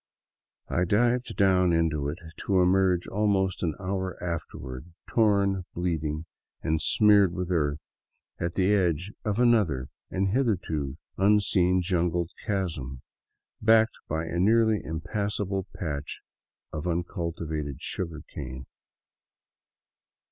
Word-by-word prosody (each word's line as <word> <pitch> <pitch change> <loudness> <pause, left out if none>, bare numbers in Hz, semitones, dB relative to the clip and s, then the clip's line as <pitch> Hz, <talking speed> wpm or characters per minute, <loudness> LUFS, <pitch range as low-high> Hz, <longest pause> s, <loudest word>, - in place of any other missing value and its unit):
I 90 - +1
dived 120 +6 +1
down 95 -3 +4
into 80 -4 +1
it, 75 - -4 0.3
to 95 -2 +3
emerge 90 -1 +3
almost 95 -2 +1
an 80 -4 -1
hour 95 -1 -3
afterward, 80 -4 -5 0.2
torn, 100 -4 +2
bleeding, 80 -3 -2 0.4
and 80 0 0
smeared 100 -4 +5
with 90 -1 -3
earth, 75 -4 0 0.5
at 85 0 -2
the 95 +2 +2
edge 90 -1 +1
of 105 -1 -1
another 105 - +3 0.2
and 95 +1 0
hitherto 90 - 0 0.2
unseen 95 -3 +3
jungled 85 -1 0
chasm, 80 - -3 0.6
backed 110 0 +4
by 80 +1 -2
a 85 +1 -3
nearly 110 +1 +4
impassable 95 +4 -2
patch 75 -4 -4 0.5
of 75 +2 -4
uncultivated 85 -4 -3
sugar 85 -4 -5
cane. 65 -1 -7
90 Hz, 110 wpm, -27 LUFS, 80-100 Hz, 0.6 s, smeared